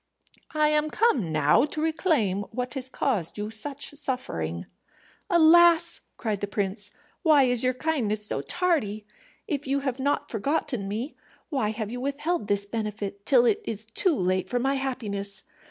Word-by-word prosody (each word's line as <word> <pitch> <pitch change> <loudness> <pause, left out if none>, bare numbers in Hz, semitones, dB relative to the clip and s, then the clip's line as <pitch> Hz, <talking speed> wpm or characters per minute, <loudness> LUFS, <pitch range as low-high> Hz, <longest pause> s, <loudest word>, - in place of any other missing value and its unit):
I 305 0 +3
am 300 0 +1
come 280 - +1
now 155 - +4
to 300 - -3
reclaim 310 - +1
what 250 +2 -4
has 260 -2 +1
caused 215 - -1
you 210 +1 -4
such 275 +6 -1
suffering." 90 - -2 0.6
"Alas!" 340 0 +5 0.2
cried 215 -4 -3
the 205 - -2
prince, 200 +1 -2 0.3
"why 310 -5 +5
is 245 -2 +4
your 255 0 +2
kindness 240 -8 0
so 140 - 0
tardy? 220 - -1 0.4
If 290 -3 -3
you 275 +1 0
have 265 -2 -3
not 285 +2 -1
forgotten 245 -2 -1
me, 225 +8 -4 0.3
why 265 -9 0
have 215 -1 -4
you 245 +1 -5
withheld 285 - -2
this 200 -1 +2
benefit 205 -2 -5
till 250 -4 +5
it 405 - +2
is 220 - -1
too 305 - +1
late 185 -3 0
for 245 - 0
my 265 +3 +1
happiness? 210 -8 -3
250 Hz, 160 wpm, -26 LUFS, 205-295 Hz, 0.6 s, Alas